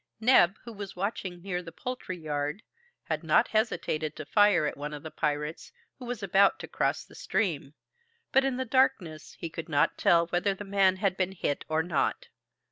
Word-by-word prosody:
Neb, 220 -6 +5
who 235 - -9
was 200 -2 -7
watching 185 -2 -4
near 180 -2 -2
the 170 -2 -10
poultry 250 -2 -5
yard, 150 +4 -3 0.4
had - - -3
not - - +3
hesitated 160 -8 -1
to 155 - -7
fire 205 -3 +4
at - - -2
one 150 +1 -5
of 145 - -10
the 160 - -7
pirates, 150 +1 -3 0.3
who 250 - -8
was 240 -3 -5
about 195 +1 +4
to - - -8
cross - - -1
the - - -18
stream; 155 -9 -2 0.6
but 270 - +5
in 265 -2 0
the 260 - -2
darkness 215 - 0
he - - -4
could 165 +1 -7
not 145 -2 +2
tell 170 0 +4
whether 180 +3 0
the 205 - -7
man 195 -1 +3
had 190 -1 0
been 190 0 0
hit 145 -6 -2
or 160 +1 +1
not. 165 -5 -1
180 Hz, 195 wpm, -28 LUFS, 155-205 Hz, 0.6 s, Neb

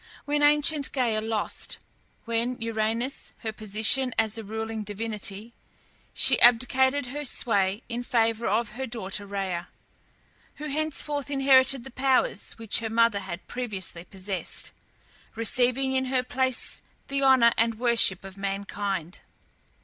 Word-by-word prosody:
When 290 0 0
ancient 295 0 +3
Gæa 235 -5 0
lost, 220 -1 -2 0.5
with 235 +2 -2
Uranus, 230 +3 -2
her 220 -2 -4
position 220 +5 +2
as 220 -1 +1
a 225 - -6
ruling 220 +1 -5
divinity, 210 +1 -4 0.6
she - - +4
abdicated 260 +3 +4
her 285 +4 -5
sway 205 -5 +1
in 240 0 -4
favour 230 -1 0
of 215 +3 0
her 260 +4 -5
daughter 205 -3 -4
Rhea, 190 -3 -3 0.9
who 300 0 -6
henceforth 295 -1 -1
inherited 270 -2 +4
the 265 - -10
powers 260 -5 +1
which 225 -2 -1
her 225 0 -4
mother 230 -2 +3
had 190 -2 -7
previously 195 -8 -4
possessed, 190 0 -3 0.6
receiving 250 +3 +2
in 260 0 +1
her 255 -1 0
place 260 0 0 0.3
the 275 0 -2
honour 260 -3 +6
and 230 -1 +1
worship 235 -6 +3
of 195 0 -11
mankind. 195 -2 -4
230 Hz, 130 wpm, -26 LUFS, 210-260 Hz, 0.9 s, honour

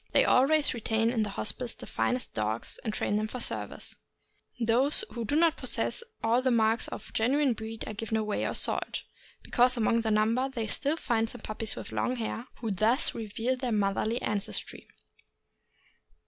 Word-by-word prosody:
They - - +5
always 290 +4 +5
retain 225 -1 0
in 235 -3 0
the 210 - -1
Hospice 230 +4 -2
the - - -10
finest 250 0 -2
dogs, 110 +1 -3
and 220 - -2
train 205 -1 -1
them 215 +1 -1
for 250 - -6
service; - - -4 0.6
those 250 - +2
who 235 -1 -4
do 285 - -1
not 330 0 +3
possess - - -1 0.2
all 230 +3 +3
the 260 - +1
marks 225 -1 +2
of - - -9
genuine 265 +4 +2
breed 220 0 -6
are - - -4
given 220 +1 -2
away 215 -1 -1
or - - -1
sold, - - +1 0.4
because 250 +1 +3
among 230 0 +2
the 225 - -1
number 225 +5 +2
they 235 -4 -3
still 285 +8 0
find 225 -6 0
some 245 - -7
pup 215 - -7
pies 220 -1 +4
with - - -8
long 250 - -1
hair, 230 +1 -4
who 225 -3 -2
thus 220 - +2
reveal 225 +3 -2
their 255 -1 -3
motherly 210 +3 0
ancestry. 205 -2 -3
230 Hz, 180 wpm, -29 LUFS, 220-255 Hz, 0.6 s, They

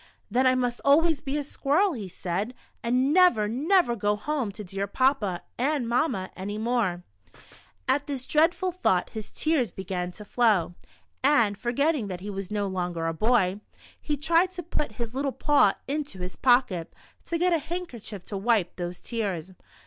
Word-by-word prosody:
•' - - -24 0.3
Then 255 +4 +3
I 255 - +4
must 245 -1 -1
always 305 +1 +4
be 285 -1 -2
a 295 - -1
squirrel," 300 +7 +1
he 215 -8 -5
said, 185 +6 -3
" - - -40
and 255 +4 +2
never, 355 - +5
never 285 - +2
go 205 -1 +1
home 255 0 -2
to 210 - -7
dear 195 +1 -3
Papa 210 -6 +1 0.2
and 275 -1 +1
Mamma 235 -6 0
any 200 +2 -5
more." 215 -6 0 0.8
At 285 +3 +1
this 270 -3 -3
dreadful 340 +4 +2
thought 265 - +1
his 215 -1 -6
tears 310 -8 +1
began 180 -1 -4
to 210 - -10
flow, 205 -7 +2 0.5
and, 235 -8 +4
forgetting 245 +3 0
that 185 -2 -5
he 205 +2 -5
was 195 -1 -5
no 205 -1 -1
longer 175 -3 -2
a 165 - 0
boy, 205 0 +2 0.4
he 295 -1 -2
tried 335 +5 +3
to 355 -1 -5
put 300 -6 -3
his 230 +1 -5
little 275 +1 -1
paw 295 +2 +3
into 285 -6 -3
his 180 0 -6
pocket, 245 -10 +2 0.3
to 335 - -1
get 355 +1 +2
a 330 - +3
handkerchief 280 - -6
to 200 - -5
wipe 205 -3 +1
those 175 0 -5
tears. 190 -6 -3
240 Hz, 180 wpm, -26 LUFS, 195-290 Hz, 0.8 s, never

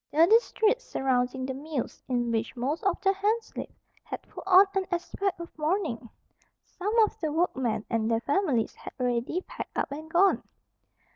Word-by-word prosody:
The 320 +3 +6
district 445 +3 +3
surrounding 260 - 0
the 265 - -3
mills, 285 -1 -4
in 240 -2 0
which 225 +2 -1
most 270 +7 -2
of 385 -3 +1
the 390 0 +3
hands 425 +4 -1
lived, - - -5 0.3
had - - -5
put - - -11
on 380 +1 +8
an 385 -1 0
aspect 355 +1 -2
of 340 - -9
mourning. 305 - -1 0.6
Some 415 +5 -3
of 425 - -1
the 315 -3 -1
workmen 265 -9 0
and 225 -1 0
their 230 0 +1
families 285 - +1
had - - -10
already 245 +7 0
packed - - -8
up - - -1
and 310 +3 -7
gone. 370 +4 +4
315 Hz, 170 wpm, -28 LUFS, 250-385 Hz, 0.6 s, on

